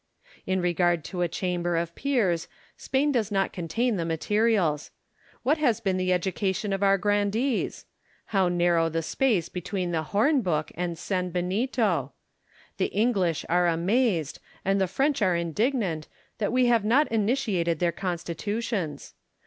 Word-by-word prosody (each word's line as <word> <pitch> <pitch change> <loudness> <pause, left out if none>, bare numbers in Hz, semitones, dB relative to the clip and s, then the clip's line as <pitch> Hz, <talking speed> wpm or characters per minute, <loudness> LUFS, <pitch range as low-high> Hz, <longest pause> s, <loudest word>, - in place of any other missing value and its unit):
In 190 0 +1
regard 175 -2 +1
to 180 +1 -5
a 175 - +2
Chamber 175 0 -2
of 170 0 -2
Peers, 210 -12 0 0.3
Spain 275 +3 0
does 230 -7 0
not 195 -1 0
contain 210 +7 -1
the 170 - -1
materials. 170 -1 +1 0.5
What 295 +5 +2
has 240 -7 +2
been 195 -4 0
the 185 0 0
education 190 +2 -1
of 195 - -2
our 195 0 +4
grandees? 205 +5 0 0.5
How 190 -3 +3
nari'ow 175 -2 +2
the 165 +1 -1
space 205 -4 +1
between 180 0 -3
the 165 -2 0
horn 265 +8 +3
book 155 -7 -1
and 175 0 -3
sanbenito 180 - -1
I - - -34 0.7
The - - +1
English 195 -7 0
are 175 +1 +3
amazed, 175 - +1 0.3
and 195 +1 +2
the 190 - +2
French 270 - 0
are 185 -3 +3
indignant, 170 - -1 0.3
that 205 - 0
we 250 +1 +3
have 235 -3 +3
not 255 +8 +3
imitated 205 - +1
their 175 +1 +1
Constitutions. 180 - -3
190 Hz, 150 wpm, -26 LUFS, 170-225 Hz, 0.7 s, our